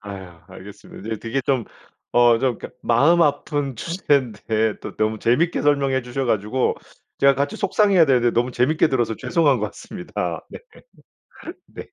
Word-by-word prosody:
아유 95 -4 -10
알겠습니다. 100 +1 -12
네. 110 -1 -3
되게 115 +5 -3
좀, 130 -3 0 0.5
어 120 -1 +5
좀 125 -2 -1
그러니까 - - -9
마음 145 +9 +4
아픈 145 -3 -1
주제인데 115 - -1
또 - - -9
너무 110 0 -1
재미있게 140 +11 +1
설명해 140 -3 +1
주셔 125 +2 -4
가지고 110 +2 0 0.4
제가 140 0 +5
같이 140 +10 -2
속상해야 200 -3 +3
되는데 125 -3 +3
너무 120 +2 0
재미있게 135 +7 +2
들어서 120 -5 0
죄송한 150 - +1
것 105 - -1
같습니다. 180 - -6
네. - - -9 1.1
네. - - -10
130 Hz, 350 characters per minute, -21 LUFS, 110-145 Hz, 1.1 s, 어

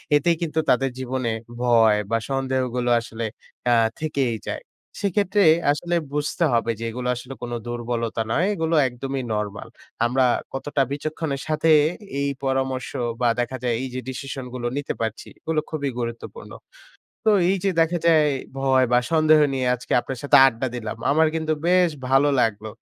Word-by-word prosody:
এতেই 165 +4 +3
কিন্তু 160 -1 -1
তাদের 135 +2 +3
জীবনে 130 -1 -2 0.3
ভয় 115 -3 +4
বা 115 - +3
সন্দেহগুলো 130 -2 -1
আসলে 115 0 -7 0.5
আ - - +6 0.3
থেকেই 140 -6 -1
যায়। - - -4 0.4
সেক্ষেত্রে 200 0 +2 0.3
আসলে 175 +4 -1 0.2
বুঝতে 150 +3 -1
হবে 115 0 +1
যে - - -5
এগুলো 125 +2 -4
আসলে 125 +2 -8
কোন 120 - -5
দুর্বলতা 120 -1 -3
নয়। 170 +9 +2
এগুলো 165 -3 0
একদমই 130 +2 -4
নরমাল। 105 -1 -4 0.4
আমরা 130 +2 +2 0.3
কতটা 140 +1 -1
বিচক্ষণের 145 -1 -3
সাথে 155 +1 +1 0.5
এই 140 0 0
পরামর্শ 130 -1 -1 0.3
বা 120 - +3
দেখা 120 +2 -2
যায় 120 -2 +1
এইযে 130 -1 -4
ডিসিশন 135 0 -6
গুলো 120 -1 -3
নিতে 145 - -2
পারছি 110 -1 -3
এগুলো 160 -1 -1
খুবই 145 -3 -2
গুরুত্বপূর্ণ। 120 - -6 0.7
তো 220 - +5 0.2
এইযে 195 0 0
দেখা 165 +2 +2
যায় 160 -2 +5 0.3
ভয় 135 -1 +3
বা 125 - +6
সন্দেহ 155 -1 +5
নিয়ে 130 -1 -1
আজকে 125 -1 -6
আপনার 130 +1 -6
সাথে 145 0 +5
আড্ডা 130 0 -1
দিলাম। 115 -3 -5
আমার 160 +3 +4
কিন্তু 160 -1 0
বেশ 180 -1 +4 0.2
ভালো 135 +2 +4
লাগলো। 110 -2 0
135 Hz, 155 wpm, -23 LUFS, 120-155 Hz, 0.7 s, আ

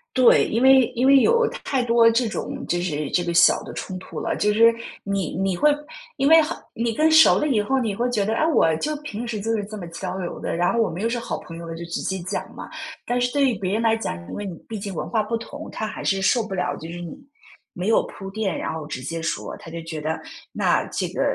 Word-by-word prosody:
对， 255 -2 +6
因 230 +3 0
为 265 -2 +7
因 245 +2 +1
为 275 0 +8
有 470 - +4 0.2
太 265 -3 0
多 235 -1 +5
这 235 +1 +1
种 215 - -5
就 175 0 0
是 150 -5 -2
这 175 - +2
个 170 0 -2
小 170 0 +5
的 - - -8
冲 185 - -5
突 - - -8
了， - - -2
就 210 - +2
是 230 +2 +6 0.3
你 195 -4 -2
你 190 -1 0
会 300 +12 +4 0.5
因 275 - +2
为 320 +2 +8
很 305 - -3 0.2
你 230 0 -1
更 310 +7 +3
熟 315 0 +7
了 300 - +1
以 240 -8 +2
后， 265 +6 0
你 225 -5 -1
会 240 +4 0
觉 215 -5 0
得， 220 - 0
啊， 310 - +2
我 165 - +3
就 305 - -2
平 245 -6 -6
时 225 -3 -3
就 225 +3 -2
是 210 - -2
这 215 +1 -8
么 185 - -6
交 180 +2 -5
流 180 -2 -5
的， - - -3
然 175 +1 +1
后 235 - +2
我 225 - +1
们 175 - -5
又 225 - +1
是 240 +1 -1
好 235 - -4
朋 165 - -10
友 170 0 -8
了， 165 - -5
就 170 +1 -7
直 170 - -4
接 190 - -2
讲 185 +3 -3
嘛。 - - -8 0.4
但 245 +1 0
是 245 0 +1
对 280 0 +3
于 - - 0
别 185 -1 -2
人 220 - +1
来 225 -1 +3
讲， 225 - -3
因 - - -7
为 205 - -4
你 180 -4 -6
毕 220 -2 -5
竟 200 0 -5
文 - - -3
化 225 - +1
不 230 +2 -2
同， 290 +7 -9
他 220 - -4
还 - - -7
是 195 -1 +1
受 230 +5 +3
不 205 -3 -5
了， 180 - -1
就 160 - -8
是 175 - -7
你 175 - -7 0.6
没 180 +2 -4
有 225 - +4
铺 195 -1 -9
垫， 200 -3 -2
然 - - -3
后 160 -2 -6
直 130 - -5
接 165 +5 -4
说。 160 - -3
他 - - -11
就 170 +1 -6
觉 160 -2 -6
得 160 +1 -2 0.3
那 - - +2
这 - - -2
个 - - -3
210 Hz, 300 characters per minute, -23 LUFS, 175-240 Hz, 0.6 s, 为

